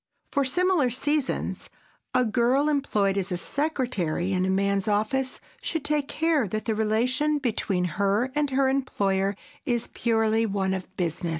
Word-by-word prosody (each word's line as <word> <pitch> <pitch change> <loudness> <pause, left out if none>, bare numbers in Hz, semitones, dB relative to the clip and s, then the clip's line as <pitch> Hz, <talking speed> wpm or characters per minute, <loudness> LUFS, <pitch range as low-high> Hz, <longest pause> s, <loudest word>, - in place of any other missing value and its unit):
For 280 - +2
similar 355 -1 +2
seasons, 285 +3 -1 0.5
a 250 - +4
girl 245 +6 +2
employed 210 -9 +1
as 180 -2 -2
secretary 225 - -1
in 185 0 +1
a - - 0
man's 200 +1 +1
office 220 +6 0 0.2
should 320 -3 -3
take 295 -2 0
care 310 -6 +1
that 215 +3 -3
the 225 - +1
relation 250 +8 +1
between 215 -8 -1
her 200 +8 +1
and 295 -1 +1
her 270 0 +2
employer 200 -7 0 0.3
is 240 -3 -1
purely 225 -1 +2
one 195 -2 0
of 190 0 -6
business. 170 -1 -2
225 Hz, 145 wpm, -26 LUFS, 195-275 Hz, 0.5 s, a